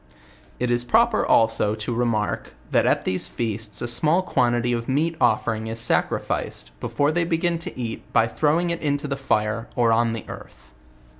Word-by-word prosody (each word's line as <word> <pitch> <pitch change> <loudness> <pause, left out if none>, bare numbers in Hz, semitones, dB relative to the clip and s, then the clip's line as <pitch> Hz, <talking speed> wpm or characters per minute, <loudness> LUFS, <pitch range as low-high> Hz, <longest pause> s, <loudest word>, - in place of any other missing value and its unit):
It 125 0 0
is 120 0 +1
proper 230 - +3
also 110 -2 +3
to 110 +2 -4
remark, 115 -3 -1 0.2
that - - +3
at - - +1
these 95 0 0
feasts 110 -3 -4
a - - -2
smell 155 +9 +2
quantity 120 -6 +1
of 115 +1 -3
meat 160 +5 +1
offering 110 -2 +1
is 115 0 -4
sacrificed, 110 - -1
before 145 +1 0
they 170 +2 +1
begin 170 0 0
to 165 - -8
eat 115 -2 -5
by 115 - +4
throwing 155 +8 +1
it 170 - -3
into 145 -1 -1
the 140 - -2
fire, 115 -4 -1
or 120 -2 +3
on 115 0 +2
the 115 - -6
earth. - - -12
120 Hz, 175 wpm, -23 LUFS, 115-150 Hz, 0.2 s, by